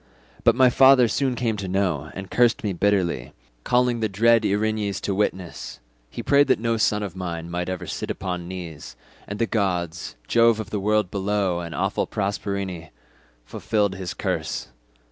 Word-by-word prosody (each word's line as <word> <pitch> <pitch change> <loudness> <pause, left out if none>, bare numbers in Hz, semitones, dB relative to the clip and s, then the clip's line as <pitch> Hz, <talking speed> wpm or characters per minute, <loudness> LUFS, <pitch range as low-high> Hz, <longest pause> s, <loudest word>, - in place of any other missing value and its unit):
But 115 - +5
my 130 0 +5
father 130 -1 +6
soon 130 +3 0
came 115 -2 -1
to 100 -2 -4
know, 90 -6 -1
and 95 0 -7
cursed 120 -1 +3
me 100 -3 -1
bitterly, 90 -9 0 0.3
calling 125 -1 +2
the 110 -1 0
dread 115 +3 +4
Erinyes 105 -1 0
to 100 - -1
witness. 95 -7 -3 0.3
He 115 - -7
prayed 145 +3 +4
that - - +4
no 115 0 0
son 105 -1 +1
of 95 -3 -6
mine 85 -2 -5
might 90 +1 -2
ever 95 -1 -4
sit - - -5
upon 90 -2 -4
knees—and 85 0 -9
the 115 - +1
gods, 90 - -2
Jove 115 -1 +4
of 105 -2 -6
the 105 - -1
world 105 -1 +1
below 100 -2 0
and 85 -1 -6
awful - - -1
Proserpine, 95 -3 -3 0.6
fulfilled 105 - -1
his 95 -2 -6
curse. - - -3
100 Hz, 165 wpm, -24 LUFS, 90-110 Hz, 0.6 s, father